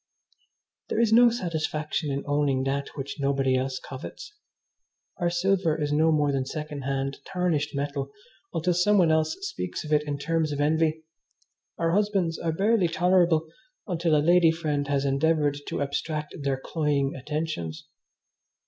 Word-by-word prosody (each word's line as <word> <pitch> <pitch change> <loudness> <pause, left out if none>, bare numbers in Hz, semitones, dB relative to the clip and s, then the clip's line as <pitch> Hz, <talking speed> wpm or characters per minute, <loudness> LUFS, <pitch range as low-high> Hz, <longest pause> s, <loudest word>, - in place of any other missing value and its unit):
There - - 0
is 230 -2 +3
no 240 +1 +8
satisfaction 160 -7 -2
in 140 +1 -2
owning 145 -2 +1
that 140 +1 -1
which 140 +2 -5
nobody 135 -1 +1
else 130 0 -1
covets. 135 - -9 0.8
Our 175 -1 +1
silver 175 -2 +1
is 145 -1 -1
no 160 +2 +4
more 150 -2 +2
than 135 -1 0
second 150 +1 -5
hand, 135 0 -2
tarnished 165 -6 -1
metal 140 -1 -3 0.4
until 175 +1 0
some 205 +4 +3
one 170 -4 +4
else 155 0 +1
speaks 395 - -4
of 155 0 -3
it 150 - +4
in 145 -1 -2
terms 160 +1 0
of 145 - -3
envy. 160 +1 +1 0.7
Our 165 0 +1
husbands 195 -4 +1
are 165 - -1
barely 200 +3 +2
tolerable 170 -2 +3 0.4
until 170 -4 +1
a 150 0 +2
lady 175 -1 +6
friend 150 -3 -1
has 140 -1 0
endeavoured 145 +1 +1
to - - -1
abstract 150 +2 -3
their 140 -1 0
cloying 145 -2 0
attentions. 140 - -4
155 Hz, 155 wpm, -26 LUFS, 140-170 Hz, 0.8 s, no